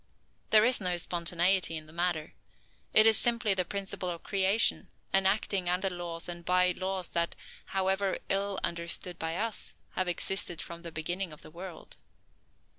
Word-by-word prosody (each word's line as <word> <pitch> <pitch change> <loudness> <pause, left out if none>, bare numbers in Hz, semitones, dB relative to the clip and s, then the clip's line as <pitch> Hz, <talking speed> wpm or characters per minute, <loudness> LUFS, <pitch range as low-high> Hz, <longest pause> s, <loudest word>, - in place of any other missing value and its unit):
There 215 0 +7
is 250 -2 +3
no 180 -2 0
spontaneity 175 0 +2
in 155 - -8
the 155 - -16
matter. 170 -2 -1 0.6
It 215 - +8
is 220 -2 +6
simply 235 -3 +2
the 185 -1 +1
principle 195 -1 -4
of 170 -1 -6
creation, 195 +3 +2 0.3
and 195 0 +5
acting 195 -2 0
under 185 +2 +1
laws 175 -2 -5
and 175 -1 -6
by 180 +1 +3
ways 190 -1 -2
that, 170 0 -1 0.3
however 190 0 0
ill 195 0 +1
understood 170 +1 -1
by 165 +1 -2
us, 225 0 -3 0.2
have 185 - -1
existed 175 -1 -1
from 170 0 -7
the 170 -1 -7
beginning 175 +3 -3
of 150 - -13
the - - -13
world. 175 0 -9
180 Hz, 165 wpm, -30 LUFS, 170-195 Hz, 0.6 s, It